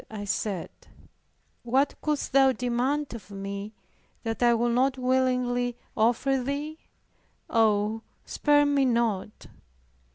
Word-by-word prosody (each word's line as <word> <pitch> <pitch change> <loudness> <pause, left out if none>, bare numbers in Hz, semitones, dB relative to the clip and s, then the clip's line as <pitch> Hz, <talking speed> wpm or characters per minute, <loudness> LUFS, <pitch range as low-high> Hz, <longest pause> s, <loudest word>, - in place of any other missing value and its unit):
I 210 -2 -6
said, 200 -2 -2 0.9
"What 265 +4 +1
couldst 300 -1 -1
Thou 270 -1 +5
demand 250 +4 -1
of 230 -3 -10
me, 200 +1 -6 0.5
that 225 0 -3
I 240 -1 +5
would 235 +1 +1
not 260 +2 +2
willingly 250 -1 0 0.2
offer 245 +4 +2
Thee? 290 +4 -4 0.7
Oh, 220 -1 +2 0.2
spare 290 -1 +3
me 285 -1 +2
not." 230 -5 -1
245 Hz, 110 wpm, -27 LUFS, 220-270 Hz, 0.9 s, Thou